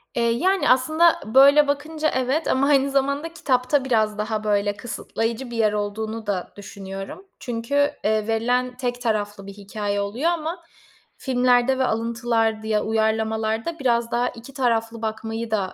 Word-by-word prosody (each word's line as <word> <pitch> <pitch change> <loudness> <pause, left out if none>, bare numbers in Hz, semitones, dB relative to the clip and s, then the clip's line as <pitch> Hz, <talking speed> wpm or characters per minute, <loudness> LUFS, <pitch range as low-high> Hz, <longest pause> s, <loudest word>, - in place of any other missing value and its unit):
Eee, 235 - +1
yani, 375 +11 +1
aslında 310 +7 +4
böyle 280 +5 +6
bakınca 305 +2 -1
evet, 260 +5 0
ama 270 +2 +2
aynı 275 -1 +3
zamanda 280 +4 0
kitapta 270 -3 +1
biraz 215 -4 +1
daha, 215 0 -2
böyle, 205 -1 0
kısıtlayıcı 235 +1 -4
bir 235 - -5
yer 215 -2 +2
olduğunu 220 +2 -3
da 185 -3 -2
düşünüyorum 195 - -8
çünkü, 275 +5 0
eee, 215 0 +1
verilen 245 +3 0
tek 245 -1 -3
taraflı 205 -4 -2
bir 200 - -8
hikâye 205 0 -3
oluyor 235 +12 0
ama 335 +1 -4 0.5
filmlerde 250 0 +2
ve 260 - +3
alıntılar, 225 -1 0
di - - -6
ya, 215 -1 +1
uyarlamalarda 220 +5 -1
biraz 235 -3 +1
daha 245 +1 +1
2 240 +3 -12
taraflı 230 -3 -1
bakmayı 225 +1 -4
da, 195 -4 -1
235 Hz, 155 wpm, -23 LUFS, 220-265 Hz, 0.5 s, böyle